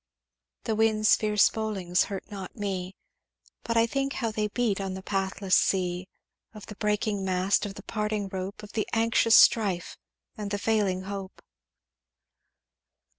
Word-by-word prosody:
"'The 225 - -1
winds' 215 -1 +4
fierce 210 -1 +3
bowlings 195 -5 0
hurt 195 -2 -5
not 195 -3 -7
me, 190 -3 -4 0.7
But 230 0 -2
I 230 - +5
think 275 +3 -2
how 230 -3 -2
they 215 0 -1
beat 210 -2 -1
on 190 -1 -3
the 190 - -8
pathless 195 -1 0
sea, 180 -1 +1 0.5
Of 210 - -10
the 210 - -9
breaking 210 -1 -1
mast 190 +2 +1
of 195 - -8
the 200 - -10
parting 210 -2 -2
rope, 190 +2 -6
Of 210 - -10
the 215 - -2
anxious 230 0 +4
strife 195 -6 +4 0.4
and 210 -3 -5
the 205 - -1
failing 200 -3 0
hope.' 195 -1 -7
205 Hz, 150 wpm, -27 LUFS, 190-220 Hz, 0.7 s, I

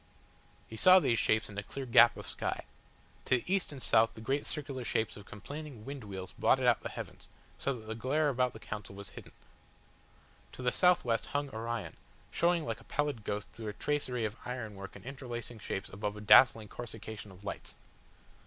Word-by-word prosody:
He 110 - -9
saw 185 - +8
these 120 -10 +2
stars 110 +1 +2
in 100 -1 -5
a - - -2
clear 135 +6 -6
gap 120 -1 +7
of - - -7
sky. - - -3 0.6
To 130 - +4
the - - -6
east 190 -2 +1
and 140 - -8
south 115 0 +4
the - - -9
great 135 +6 -1
circular 135 -4 -3
shapes 110 -4 0
of 100 - -11
complaining 140 +1 -8
wind 140 -2 -6
wheels 95 -2 -6
blotted - - +3
out - - +4
the - - -4
heavens, - - -8 0.3
so 140 - 0
that 110 -3 -10
the 110 - -4
glare 135 +7 +1
about 125 -2 +1
the 110 - -9
Council 105 -2 -7
House - - -12
was 100 - -8
hidden. - - -11 1.2
To 130 - -7
the 125 - +3
southwest 145 - +3
hung 145 -1 -2
Orion, 115 -6 -4 0.3
showing 170 -1 +2
like 115 -2 -3
a - - -17
pallid 145 -6 -1
ghost 105 0 -3
through 110 -1 -7
a 105 - -3
tracery 125 -1 -1
of 105 +1 -4
iron 125 -4 -4
work 100 0 -9
and - - -12
interlacing 120 -3 -6
shapes 95 -1 -4
above 105 +1 -4
a - - -7
dazzling 110 0 +7
coruscation 110 -2 -8
of 95 +1 -14
lights. 100 - -6
115 Hz, 200 wpm, -32 LUFS, 105-135 Hz, 1.2 s, saw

